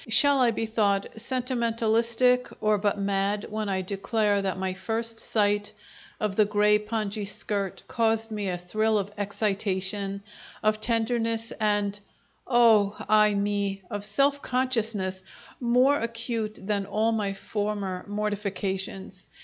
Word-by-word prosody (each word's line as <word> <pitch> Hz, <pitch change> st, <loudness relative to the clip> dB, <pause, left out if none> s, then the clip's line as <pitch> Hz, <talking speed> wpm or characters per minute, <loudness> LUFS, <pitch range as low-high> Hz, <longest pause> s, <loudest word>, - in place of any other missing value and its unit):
Shall 275 Hz, +4 st, +4 dB
I 250 Hz, -2 st, +5 dB
be 225 Hz, 0 st, -1 dB
thought 205 Hz, -3 st, +1 dB
sentimentalistic 235 Hz, 0 st, +1 dB
or 215 Hz, -1 st, +2 dB
but 205 Hz, 0 st, +1 dB
mad 200 Hz, +1 st, 0 dB
when 215 Hz, -1 st, -2 dB
I 190 Hz, -1 st, 0 dB
declare 205 Hz, +1 st, 0 dB
that 190 Hz, -1 st, -2 dB
my 190 Hz, 0 st, -2 dB
first 225 Hz, +4 st, -3 dB
sight 205 Hz, -1 st, +1 dB, 0.5 s
of 210 Hz, -2 st, -1 dB
the 215 Hz, -, +5 dB
grey 210 Hz, 0 st, +3 dB
pongee 210 Hz, -1 st, -3 dB
skirt 200 Hz, -1 st, -3 dB
caused 225 Hz, -1 st, 0 dB
me 205 Hz, -2 st, -2 dB
a 180 Hz, -, -2 dB
thrill 215 Hz, +5 st, 0 dB
of 200 Hz, 0 st, -2 dB
excitation, 200 Hz, -1 st, -2 dB, 0.4 s
of 215 Hz, 0 st, +2 dB
tenderness, 230 Hz, -1 st, 0 dB
and 205 Hz, -1 st, +1 dB, 0.5 s
oh 225 Hz, -5 st, +5 dB
i 210 Hz, -1 st, +5 dB
me! 200 Hz, -1 st, -1 dB
of 205 Hz, -1 st, -3 dB
self 275 Hz, +7 st, +1 dB
consciousness 225 Hz, -7 st, -1 dB, 0.4 s
more 250 Hz, +4 st, +4 dB
acute 230 Hz, -2 st, -3 dB
than 200 Hz, 0 st, -2 dB
all 220 Hz, +2 st, +1 dB
my 205 Hz, -3 st, -1 dB
former 205 Hz, -2 st, -3 dB
mortifications. 200 Hz, -2 st, -3 dB
210 Hz, 130 wpm, -27 LUFS, 200-225 Hz, 0.5 s, I